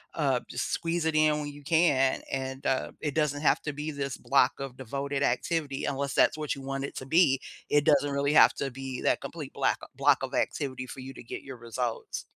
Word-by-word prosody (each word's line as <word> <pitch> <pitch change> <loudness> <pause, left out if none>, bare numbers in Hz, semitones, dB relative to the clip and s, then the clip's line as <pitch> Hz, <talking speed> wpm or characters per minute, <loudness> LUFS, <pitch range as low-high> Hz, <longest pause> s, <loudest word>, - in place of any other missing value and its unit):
uh, 135 -5 +2
just 125 - -3
squeeze 165 -1 -1
it 160 - +1
in 155 -1 +4
when 150 - -4
you 145 0 -11
can, 150 -4 +3
and, 135 +1 -4
uh, 130 - 0
it 150 -2 -2
doesn't 150 -1 0
have - - +3
to 150 - -3
be 150 +2 -4
this 140 -2 -4
block 135 -2 +2
of 135 -2 -6
devoted 140 +2 -3
activity 140 +2 0
unless 140 -1 -2
that's - - +4
what 150 -2 -2
you 135 - -9
want 135 0 -3
it - - -8
to 130 - -5
be. 140 -3 +4 0.3
It 145 -1 +4
doesn't 145 -2 +4
really 140 +1 +1
have - - +7
to 135 - -3
be 130 0 -6
that - - +2
complete - - -7
black - - +1 0.2
block - - +3
of - - -4
activity 130 -2 -2
for 130 - -8
you 135 +1 -8
to - - -11
get - - -7
your 135 -2 -9
results. 120 0 -4
140 Hz, 225 wpm, -28 LUFS, 130-150 Hz, 0.3 s, have